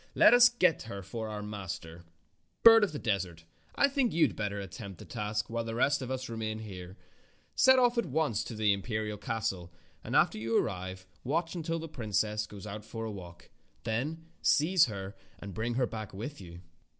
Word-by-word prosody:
"Let - - +7
us 245 0 +8
get 185 -9 +2
her 100 -2 -6
for 110 +4 -5
our 105 -1 -5
master. 90 -5 -7 0.6
Bird 225 -1 +9
of 205 - +1
the 150 - -5
Desert, 95 - -2 0.3
I 280 - +5
think 275 -4 +1
you 165 0 +5
had - - -3
better 100 -1 -2
attempt 100 -1 -8
the - - -11
task 105 0 -3
while 115 0 -2
the 115 0 -4
rest 140 +4 +2
of 130 - -5
us 130 0 -3
remain 110 -1 -3
here. 95 -3 -9 0.6
Set 260 0 +6
off 245 -1 +4
at 235 - -1
once 140 -7 0
for 115 - -7
the 105 -1 +3
imperial 105 +1 -3
castle, 95 -6 -3 0.3
and - - -4
after - - +4
you 115 +1 +1
arrive 95 -2 -2 0.2
watch 165 +5 -1
until 165 -1 -2
the 165 0 -5
princess 110 -5 -1
goes 105 0 -10
out 105 0 -6
for 115 +1 -6
a 110 - -4
walk. 90 -3 -11 0.3
Then 140 +9 -2 0.2
seize 165 +3 +4
her 100 -1 -6 0.2
and 100 -1 -8
bring 115 +5 -2
her 125 0 +2
back 110 -4 -7
with 120 +7 -6
you." 85 -1 -10
110 Hz, 200 wpm, -31 LUFS, 100-145 Hz, 0.6 s, Bird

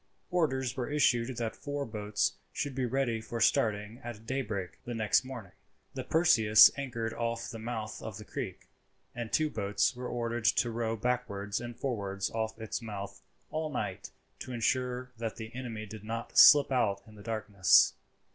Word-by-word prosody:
Orders 130 -8 0
were 130 -1 -3
issued 130 -4 +2
that 115 -2 -2
four 145 -1 -4
boats 105 -2 -1 0.2
should 145 - -3
be 130 -1 -1
ready 120 -3 0
for 115 +1 -5
starting 110 +1 +1
at 115 -2 -8
daybreak 105 -8 -3
the 120 - -5
next 110 +1 +3
morning. 125 -8 -8 0.4
The - - -4
Perseus 115 -11 +6
anchored 115 -5 -3
off 115 0 -3
the 115 - -7
mouth 110 -1 -5
of 110 -3 -6
the 105 - -10
creek; 120 -9 -6 0.5
and 120 -2 -5
two 155 -1 +2
boats 100 +3 0
were 125 0 -5
ordered 120 -1 -3
to 120 +1 +3
row 115 0 -1
backwards 115 -3 -2
and 120 0 -7
forwards 100 -7 -2
off 110 0 -3
its 110 +2 -4
mouth 100 -3 -7 0.3
all 155 0 -2
night 135 - -4 0.3
to 130 - -7
ensure 125 +1 -1
that 115 -1 -3
the 110 0 -8
enemy 115 -4 -5
did 105 0 -10
not 115 +2 -5
slip 145 -2 +9
out 100 -6 +1
in 110 - -15
the 105 - -13
darkness. 105 -4 +4
115 Hz, 170 wpm, -31 LUFS, 110-125 Hz, 0.5 s, slip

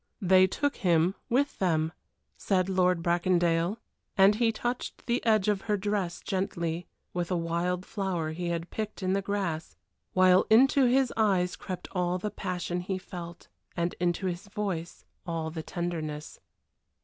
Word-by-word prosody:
"They 185 0 +6
took 285 +9 -1
him 175 0 +3 0.2
with 275 +4 +1
them," 160 -3 +1 0.4
said 190 -2 0
Lord 180 -2 +2
Bracondale, 175 +1 +2 0.4
and 195 +1 +7
he 225 +1 +2
touched 240 +2 -4
the 240 +1 0
edge 215 -4 +3
of 205 -2 +1
her 210 - +3
dress 195 -3 -2
gently 175 -3 -2 0.3
with 175 -1 -2
a 180 - +1
wild 170 +2 -1
flower 185 -6 -2
he 175 +2 -4
had 170 0 -3
picked 215 -2 -4
in 185 0 +1
the 195 - +1
grass, 190 -6 -3 0.4
while 185 0 +5
into 265 +4 +6
his 255 +1 +3
eyes 190 -5 +2
crept 185 -2 -6
all 180 -1 0
the 210 +3 -3
passion 180 -2 -3
he 185 +1 -3
felt 175 -2 -9 0.3
and 170 0 0
into 175 +2 0
his 180 +2 -3
voice 195 -5 -4 0.2
all 165 -1 -2
the 160 0 -4
tenderness. 155 -3 -4
180 Hz, 155 wpm, -29 LUFS, 170-200 Hz, 0.4 s, and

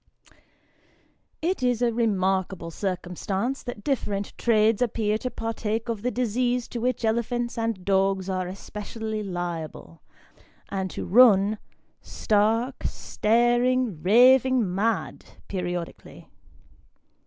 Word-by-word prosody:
IT 355 -2 0
is 245 -2 +1
a 240 -1 +1
remarkable 190 -6 0
circumstance, 190 +7 -3
that 245 -5 -7
different 205 -8 -2
trades 220 -1 +2
appear 220 -3 0
to 250 +4 -3
partake 225 0 -3
of 225 -3 -2
the 250 - 0
disease 245 0 0
to 240 - -5
which 245 -1 -1
elephants 235 +2 -1
and 225 -5 -3
dogs 195 -1 +1
are 185 -1 -2
especially 215 +3 -6
liable, 175 - -6 0.7
and 190 -1 -2
to - - -5
run 210 -2 +5 0.4
stark, 225 +5 0
staring, 240 -3 +1
raving 245 +1 +5
mad, 220 +4 -1 0.2
periodically. 175 -3 -5
220 Hz, 105 wpm, -25 LUFS, 190-240 Hz, 0.7 s, run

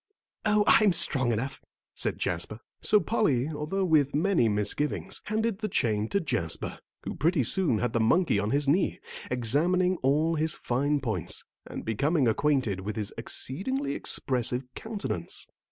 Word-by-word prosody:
"Oh, 210 -1 +3
I'm 210 -3 +5
strong 140 -7 +2
enough," 115 +5 -3 0.3
said - - -1
Jasper. 90 +5 -2 0.2
So 210 - +4
Polly, 155 - +1
although 160 +6 -2
with 150 -5 +2
many 165 - +2
misgivings, 145 - -1
handed 220 -1 -1
the 215 - -2
chain 110 - 0
to 200 - +1
Jasper, 120 - -3 0.2
who - - -4
pretty 160 0 +1
soon 155 - +3
had 120 +1 -1
the 115 - +1
monkey 115 - +3
on 105 +1 -1
his 140 +3 +1
knee, 170 +7 +2 0.3
examining 170 +10 +2
all 150 +5 +1
his 160 0 +1
fine 140 +4 0
points, 110 -9 -3 0.2
and - - -7
becoming 140 +6 +1
acquainted 125 -4 +1
with 105 +2 -4
his 105 -2 -4
exceedingly 260 - -2
expressive 125 -1 +1
countenance. 220 -2 -4
145 Hz, 150 wpm, -28 LUFS, 120-185 Hz, 0.3 s, I'm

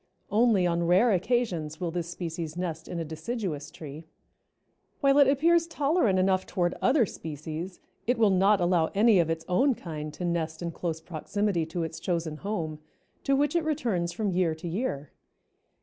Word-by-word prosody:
Only 215 -4 +4
on 170 -1 +1
rare 190 +7 +5
occasions 180 -7 0
will 175 -2 -2
this 170 0 -3
species 170 -2 -5
nest 165 -3 -4
in 175 - -5
a 165 - -3
deciduous 160 0 -4
tree. 150 0 -9 1.0
While 275 0 +4
it 280 - +7
appears 330 +5 +3
tolerant 295 - +2
enough 185 0 +2
toward 175 -1 0
other 265 -4 +4
species, 160 +2 -6 0.3
it 245 0 +2
will 220 -3 +4
not 195 +2 +4
allow 175 -2 +2
any 210 -1 +5
of 165 -2 +2
its 165 0 -2
own 255 +9 +3
kind 155 -5 -6
to 175 - -4
nest 165 -1 -2
in 170 - -2
close 165 -1 -4
proximity 175 +1 -2
to 165 +1 -3
its 160 0 -5
chosen 165 -4 -2
home, 165 -6 -4 0.5
to 275 - +3
which 290 +3 +1
it 340 - +2
returns 230 - -1
from 200 +3 -1
year 175 -3 +1
to 160 +2 -7
year. 165 - -3
180 Hz, 175 wpm, -28 LUFS, 160-220 Hz, 1.0 s, it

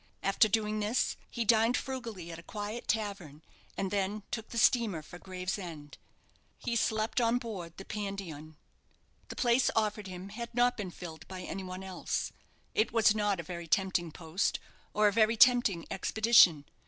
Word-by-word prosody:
After 195 +3 +4
doing 215 0 0
this, 215 +4 +1
he 235 -2 -2
dined 225 +2 +4
frugally 230 -10 -5
at 165 - -8
a - - -9
quiet 210 +5 -6
tavern, 195 -9 -3 0.3
and 195 -1 -2
then 205 +1 -1
took 225 -2 -4
the 235 - -6
steamer 220 -7 +3
for 175 +3 -11
Gravesend. 180 -5 -6 0.6
He 235 - -3
slept 220 +1 +1
on 230 +1 +3
board 195 -9 -6
the 195 - -8
"Pandion." 190 -7 -6 0.7
The - - -6
place 240 +1 +3
offered 215 -2 0
him 185 +1 -8
had 235 +3 -7
not 245 0 +3
been 200 -4 -4
filled 160 -3 -9
by 185 -1 -7
any 190 +1 -5
one 185 +1 -6
else. 190 -2 -3 0.4
It 215 - +2
was 220 -2 +5
not 205 -3 0
a - - -3
very 170 0 -7
tempting 180 -1 +1
post, 165 +4 -1 0.4
or 210 0 +5
a 205 - +2
very 225 +1 +3
tempting 240 -8 +5
expedition. 195 -7 +5
205 Hz, 165 wpm, -31 LUFS, 180-225 Hz, 0.7 s, was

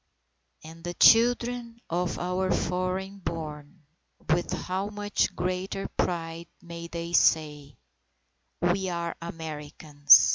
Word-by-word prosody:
And 165 +1 -12
the 175 0 -4
children 235 0 +4
of 175 +1 -1
our 180 +1 -1
foreign 185 +2 -1
born, 155 -2 -6 0.5
with 175 +2 +1
how 190 +2 -2
much 205 0 -1
greater 185 +2 -2
pride 165 -1 -2
may 170 -2 -8
they 170 0 -6
say, 150 -4 +2 0.8
"We 185 +2 +1
are 170 -1 -3
Americans!" 150 -3 +4
175 Hz, 105 wpm, -27 LUFS, 165-190 Hz, 0.8 s, children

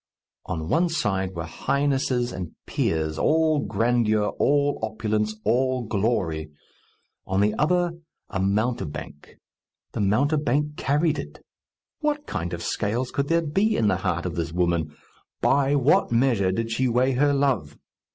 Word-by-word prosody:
On 80 -1 -3
one 170 - +2
side 95 - -1
were 85 -1 -4
highnesses 130 - 0
and 90 -3 -6
peers, 80 -1 -1
all 155 -1 +3
grandeur, 115 -5 +1
all 145 0 +2
opulence, 110 -1 -1
all 130 +1 +1
glory; 95 -8 -1 0.8
on 95 0 0
the 105 +1 +3
other, 175 +3 +2 0.4
a 100 - -4
mountebank. 100 - -2 0.5
The - - -3
mountebank 145 +7 +1
carried 150 +2 +1
it! - - -9 0.5
What 300 -1 -1
kind 85 +1 -3
of 85 -1 -5
scales 115 +4 -1
could 140 0 -1
there 165 +1 +2
be 200 +9 +1
in 105 - +3
the 95 - +1
heart 90 -2 -2
of 90 - -2
this 85 -1 -3
woman? 85 -3 0 0.5
By 140 +1 +3
what 140 -2 +3
measure 115 -6 +2
did 115 +3 -2
she 130 +3 +1
weigh 125 +2 +2
her 145 +3 +3
love? 135 - 0
115 Hz, 140 wpm, -25 LUFS, 95-140 Hz, 0.8 s, all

